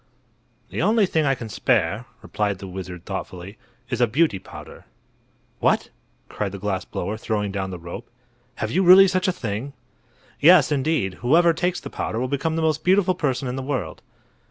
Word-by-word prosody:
"The - - -2
only 215 -1 +3
thing 160 -4 0
I 135 - +2
can 120 -2 -7
spare," 105 +1 0 0.2
replied 105 -2 -2
the 95 0 -9
wizard, 90 -2 -8
thoughtfully, 95 +3 -7 0.3
"is 120 0 -1
a 120 - +5
Beauty 130 - +1
Powder." - - -12 0.7
"What!" - - +1 0.4
cried 100 -2 -4
the - - -5
glass 95 -2 -3
blower, 105 +2 -4
throwing 105 -3 -2
down 95 -1 -3
the 90 - -6
rope, 85 0 -9 0.5
"have 110 - -3
you 185 - +2
really 190 +1 +8
such 185 +1 0
a - - +3
thing?" 120 - -5 0.7
"Yes, 155 -2 +6
indeed. 135 - 0
Whoever 165 +7 +4
takes 175 +2 -1
the - - -9
powder 110 - -3
will 130 - -1
become 140 +4 -1
the 165 - -1
most 155 -1 0
beautiful 185 0 +3
person 135 -6 -2
in 125 +1 -3
the - - -3
world." 130 - -4
125 Hz, 180 wpm, -23 LUFS, 100-165 Hz, 0.7 s, really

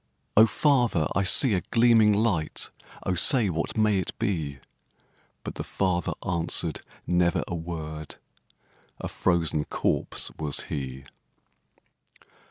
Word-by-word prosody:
'O 110 +2 +7
father! 120 - +2
I 95 - +2
see 110 +5 +5
a 90 - +1
gleaming 115 -2 +5
light, 100 -7 0 0.3
O 95 - 0
say, 105 +3 +5
what 85 +5 -2
may 105 -2 +3
it 90 - -5
be?' 75 -8 -2 0.9
But - - -6
the - - -5
father 90 -3 -1
answered 85 -2 -1 0.2
never 90 0 +1
a - - -5
word, 80 -2 -6 0.8
A - - -4
frozen 85 -4 0
corpse - - -2
was 75 -3 -2
he. 65 -2 -5
90 Hz, 120 wpm, -26 LUFS, 80-105 Hz, 0.9 s, O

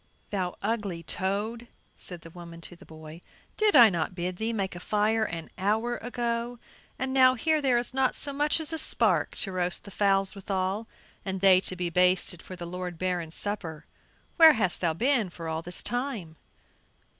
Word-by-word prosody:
"Thou 185 -3 -2
ugly 200 -6 -2
toad," 210 +7 -3 0.3
said 175 -2 -6
the 165 - -12
woman 170 -1 -11
to 175 - -8
the - - -17
boy, 160 +1 -11 0.3
"did 430 -1 +2
I 230 -4 +9
not 170 +1 -2
bid 180 0 -4
thee 220 +3 -2
make 195 -5 -3
a - - -7
fire 215 +3 +1
an 165 -4 -6
hour 220 +5 0
ago? 240 0 -3 0.4
and 260 0 -2
now, 255 -1 +6
here 310 +5 +1
there 260 -4 +2
is 240 +1 -1
not 265 -1 +1
so 285 - -1
much 295 +3 +2
as 320 +1 -4
a 320 - -2
spark - - +1
to 195 - -1
roast 180 -1 +2
the 200 - -11
fowls 195 -1 +2
withall, 195 +2 -3 0.4
and 190 -1 -3
they 185 -1 +6
to 185 - 0
be 180 -1 -3
basted 180 0 +2
for 185 - -9
the 175 -1 -7
lord 180 0 -6
Baron's 175 -2 -2
supper. 185 -7 -3 0.5
Where 320 -2 +9
hast 200 -8 -1
thou 170 -3 +1
been 240 - +1
for 170 -1 -8
all 160 0 -3
this 175 +1 +3
time?" 240 - -3
195 Hz, 190 wpm, -27 LUFS, 175-235 Hz, 0.5 s, I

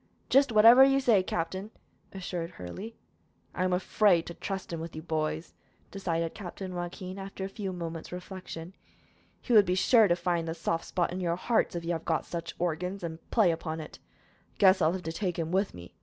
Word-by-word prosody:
"Jist 275 -1 +5
whatever 230 +4 +8
you 270 0 +5
say, 235 -7 +4
captain," 185 +3 -3 0.4
assured 180 -3 -4
Hurley. 185 - -8 0.6
"I 180 - -1
am 185 - +1
afraid 180 -1 +3
to 170 - -7
trust 190 -1 -5
him 165 - -3
with 165 0 -7
you, 155 - -6
boys," 160 0 -2 0.4
decided 170 -4 -2
Captain 190 -1 -7
Joaquin, 180 +2 -5
after 195 0 -6
a - - -2
few 195 -1 -5
moments' 165 -2 -6
reflection. 180 -1 -8 0.7
"He 245 - -1
would 210 -2 +8
be 180 - +2
sure 220 +3 +5
to 175 - +3
find 175 -1 -1
the 165 - -3
soft 165 0 -2
spot 175 -1 -1
in 185 - -3
your 170 -2 0
hearts, 220 +1 +1
if 170 -1 -4
you 170 - -1
have 165 -1 -2
got 160 - 0
such 165 -1 -5
organs, 180 +3 -2
and 160 -1 -5
play 210 -7 +4
upon 160 -1 -4
it. 155 - -9
I - - -35
guess 190 -2 +5
I 155 - +5
will 180 +3 -1
take 175 +2 -3
him 165 -1 -2
with 190 +2 0
me. 85 0 -11
180 Hz, 200 wpm, -29 LUFS, 165-195 Hz, 0.7 s, whatever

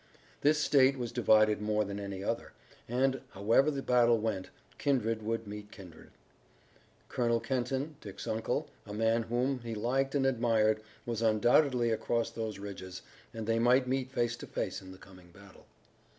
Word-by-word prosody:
This 150 +2 +4
state 140 -2 +4
was 120 -2 -4
divided 110 -3 +4
more 105 0 +1
than 100 0 -5
any 100 -1 -5
other, - - -3 0.4
and, 130 +2 +1
however 115 +9 +3
the 140 -2 -3
battle 120 -2 +4
went, 105 -4 -3 0.3
kindred 115 -5 0
would 115 +1 -2
meet 105 0 -8
kindred. 90 -6 -13 1.0
Colonel 115 -1 +1
Kenton, 130 +4 -2
Dick's 100 -2 -8
uncle, 110 +1 -1 0.2
a 105 - -6
man 115 +1 +2
whom 125 +4 -1
he 115 -2 -6
liked 135 +6 0
and 135 -1 +2
admired, 115 -4 +2 0.2
was 115 -2 -3
undoubtedly 120 +3 +3
across 115 +1 -1
those 110 -2 -4
ridges, 95 -2 -8 0.3
and 115 -1 -6
they 115 +1 +1
might 125 +2 +4
meet 130 0 -1
face 120 -2 0
to - - -9
face - - -3
in 95 -1 -11
the 95 - -11
coming 90 -2 -16
battle. 100 +2 -17
115 Hz, 165 wpm, -31 LUFS, 105-125 Hz, 1.0 s, This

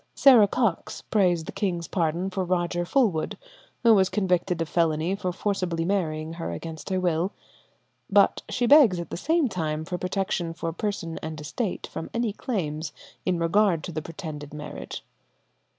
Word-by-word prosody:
Sarah 245 -7 +7
Cox 220 -5 -1
prays 180 -6 +2
the - - -7
king's 175 -5 -2
pardon 175 +2 -1
for 190 0 -1
Roger 175 -1 0
Fulwood, 195 - +1 0.5
who 230 -1 +7
was 190 -3 +4
convicted 180 -3 0
of 165 - -1
felony 165 +2 +1
for 190 -2 -2
forcibly 180 -3 -1
marrying 160 -4 -1
her 165 0 -4
against 160 -3 -7
her 185 -1 +1
will. 180 +1 0 0.8
But - - +4
she 245 - 0
begs 245 - +7
at 170 - -6
the - - -3
same 320 - +2
time 160 -6 -2
for 180 +1 -4
protection 185 -3 -2
for 165 -1 -3
person 175 -4 -3
and 155 -1 -5
estate 185 - -3
from 165 - -6
any 230 -3 0
claims 155 - -3 0.3
in 180 -1 +2
regard 170 0 +2
to 180 - -5
the 155 -1 -3
pretended 150 -2 -7
marriage. 145 - -7
175 Hz, 165 wpm, -26 LUFS, 160-195 Hz, 0.8 s, Sarah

